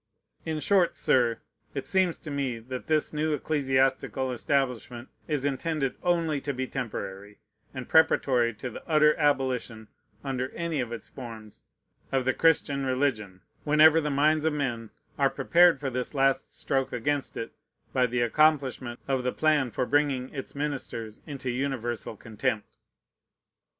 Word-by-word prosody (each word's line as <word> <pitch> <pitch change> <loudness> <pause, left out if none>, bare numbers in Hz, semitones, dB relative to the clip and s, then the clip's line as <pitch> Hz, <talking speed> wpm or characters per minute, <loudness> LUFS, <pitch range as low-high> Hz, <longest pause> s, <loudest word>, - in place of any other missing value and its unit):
In 160 -1 -1
short, 185 +1 +2
Sir, 120 -3 +2 0.3
it 135 - -3
seems 190 -3 +2
to 155 - -8
me 135 -4 -2
that 125 +3 -7
this 155 -1 +1
new 155 +1 0
ecclesiastical 135 -2 0
establishment 125 -2 -1 0.2
is 145 -3 -1
intended 140 0 -1
only 165 -5 +1
to 140 -1 -3
be 130 +1 -2
temporary, 105 -6 -6 0.3
and 130 -2 -7
preparatory 130 -7 +4
to 120 +3 -6
the - - -9
utter 150 -1 +5
abolition, 130 -7 0 0.3
under 130 -2 -2
any 170 -3 -2
of 120 -2 -2
its 115 -3 -7
forms, 115 -4 -10 0.5
of 135 -2 +1
the 130 - +2
Christian 145 -4 +2
religion, 130 -8 -1 0.2
whenever 155 +2 +6
the 150 - -1
minds 150 +2 +2
of 160 - +2
men 120 -6 -2 0.3
are 135 -1 +4
prepared 175 -1 +4
for 135 -2 -3
this 125 +3 -3
last 135 0 +2
stroke 135 -1 -1
against 140 +4 -2
it 115 - -4 0.4
by 125 -1 +3
the 120 0 -1
accomplishment 130 -2 +2
of 135 -2 +1
the 125 0 -1
plan 150 -4 +2
for 120 - -1
bringing 140 -2 +1
its 135 -1 -6
ministers 135 -7 -4
into 135 -4 -4
universal 120 -4 -3
contempt. 110 0 -3
135 Hz, 150 wpm, -27 LUFS, 125-150 Hz, 0.5 s, whenever